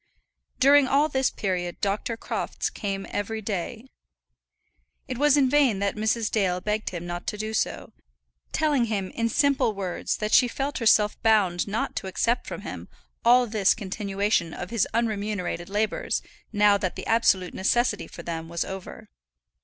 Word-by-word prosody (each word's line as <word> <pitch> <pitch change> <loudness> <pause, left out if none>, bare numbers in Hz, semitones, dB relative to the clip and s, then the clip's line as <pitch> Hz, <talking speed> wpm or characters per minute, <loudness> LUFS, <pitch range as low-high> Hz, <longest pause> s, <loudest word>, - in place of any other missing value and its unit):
During 280 +1 +6
all 285 +4 +3
this 265 -2 +1
period 180 -3 -3
Dr. 205 +3 -1
Crofts - - -3
came 195 -1 -4
every 205 +2 -3
day. 215 +3 -4 1.2
It 255 -2 -5
was 295 0 +5
in 275 -2 +4
vain 270 -6 +3
that 200 0 -1
Mrs. 220 +1 0
Dale 185 -4 +1
begged 210 +3 -2
him 175 -1 -6
not 175 0 -6
to 210 - -2
do 215 +1 -4
so; - - -2 0.6
telling 295 -6 +2
him 200 -4 -2
in 230 0 -1
simple 280 -4 +2
words 190 -3 -3
that 215 0 -3
she 250 - +6
felt 275 +3 -3
herself 215 -2 +3
bound 205 -6 +3
not 210 +2 -2
to 190 - -3
accept 230 +5 0
from - - -6
him - - -7 0.4
all 245 +1 +6
this 210 -4 +2
continuation 195 -3 -1
of 180 - -6
his 230 -4 +1
unremunerated 210 -6 -2
labours 210 +2 -1 0.3
now 205 -1 +4
that 185 -3 -2
the - - -6
absolute 195 -5 +2
necessity 240 +6 +1
for - - -10
them 165 -1 -5
was 170 0 -2
over. 190 -1 -8
210 Hz, 160 wpm, -25 LUFS, 195-235 Hz, 1.2 s, During